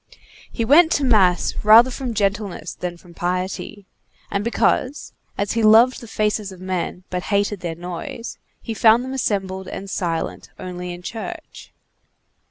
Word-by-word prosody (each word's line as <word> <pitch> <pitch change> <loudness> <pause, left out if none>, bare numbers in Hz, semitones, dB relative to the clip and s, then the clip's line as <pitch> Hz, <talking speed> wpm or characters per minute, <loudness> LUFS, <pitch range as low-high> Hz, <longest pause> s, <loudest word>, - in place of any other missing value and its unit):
He 230 - -2
went 320 +7 +6
to 290 - 0
mass 195 -9 +3
rather 225 +4 +7
from 245 -2 -4
gentleness 200 -4 -2
than 175 -1 -5
from 170 0 -17
piety, 185 +3 -3 0.5
and 200 0 -1
because, 255 +4 0 0.2
as 200 0 -1
he 230 - 0
loved 225 +4 +5
the 235 - -10
faces 210 -2 -1
of 185 - -12
men, 185 -1 -3
but 180 -1 -3
hated 205 -1 +1
their 170 -3 -4
noise, 180 +6 -7 0.2
he 230 - -4
found 225 +2 +4
them 260 - -5
assembled 190 -6 -2
and 195 - -7
silent 165 -3 -3
only 180 -1 -6
in 175 0 -9
church. 315 - -8
200 Hz, 155 wpm, -21 LUFS, 180-230 Hz, 0.5 s, rather